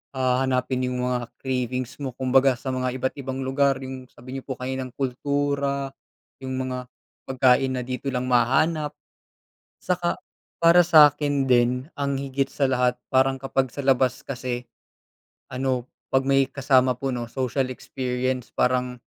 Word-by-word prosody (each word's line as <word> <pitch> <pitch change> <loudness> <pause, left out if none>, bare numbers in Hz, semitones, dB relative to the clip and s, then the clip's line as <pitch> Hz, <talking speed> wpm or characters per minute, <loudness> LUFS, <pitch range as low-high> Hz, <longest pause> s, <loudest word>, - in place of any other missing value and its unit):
ah, 130 0 +1
hanapin 130 0 0
yung 125 0 -2
mga 125 -1 -1
cravings 130 0 -3
mo 130 -3 -5
kumbaga 130 0 +3
sa 130 +2 -5
mga 130 0 -2
iba't 130 0 -2
ibang 135 0 -4
lugar, 135 +1 +2
yung 130 -1 -7
sabi 125 +1 -13
niyo - - -17
po 130 - -3
kaninang 130 0 -5
kultura, 140 +1 -1 0.5
yung 130 0 -5
mga 130 -1 -4 0.4
pagkain 130 0 +3
na 125 - -2
dito 130 +2 -5
lang 125 -1 -2
mahahanap. 150 +5 +2 0.9
Saka, 175 -1 -1 0.4
para 170 +1 +6
sa'kin 145 -4 +5
din, 125 +2 +2
ang 140 -2 -1
higit 135 0 -2
sa 140 -2 +1
lahat 125 -1 +1
parang 135 0 +2
kapag 135 -2 -1
sa - - -5
labas 130 -2 +2
kasi, 125 -2 -5 0.8
ano, 130 -1 -1 0.2
'pag 135 0 +2
may 135 -1 +3
kasama 130 -2 +2
po, 135 +1 -2
'no, 120 -1 -4
social 130 +1 -1
experience 130 -1 -3
parang 125 0 +1
130 Hz, 150 wpm, -24 LUFS, 125-135 Hz, 0.9 s, para